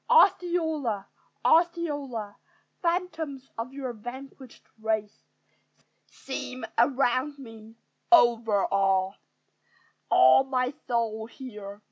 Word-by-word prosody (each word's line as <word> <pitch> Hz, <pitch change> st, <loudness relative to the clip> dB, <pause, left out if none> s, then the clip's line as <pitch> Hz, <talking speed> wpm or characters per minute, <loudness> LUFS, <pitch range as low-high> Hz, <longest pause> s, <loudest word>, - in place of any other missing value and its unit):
Osceola! 320 Hz, -, +3 dB, 0.4 s
Osceola! 290 Hz, -, +1 dB, 0.5 s
Phantoms 330 Hz, -6 st, -2 dB
of 230 Hz, +3 st, -5 dB
your 270 Hz, -3 st, -5 dB
vanquished 255 Hz, +3 st, -10 dB, 0.2 s
race 220 Hz, -1 st, -2 dB, 0.8 s
Seem 255 Hz, -1 st, -6 dB
around 260 Hz, +3 st, +2 dB
me: 225 Hz, -4 st, -12 dB, 0.4 s
overawe 200 Hz, -, +3 dB, 1.0 s
All 130 Hz, -, +6 dB
my 255 Hz, 0 st, -1 dB
soul 225 Hz, -2 st, -1 dB
here. 210 Hz, -5 st, -9 dB
250 Hz, 75 wpm, -27 LUFS, 220-285 Hz, 1.0 s, All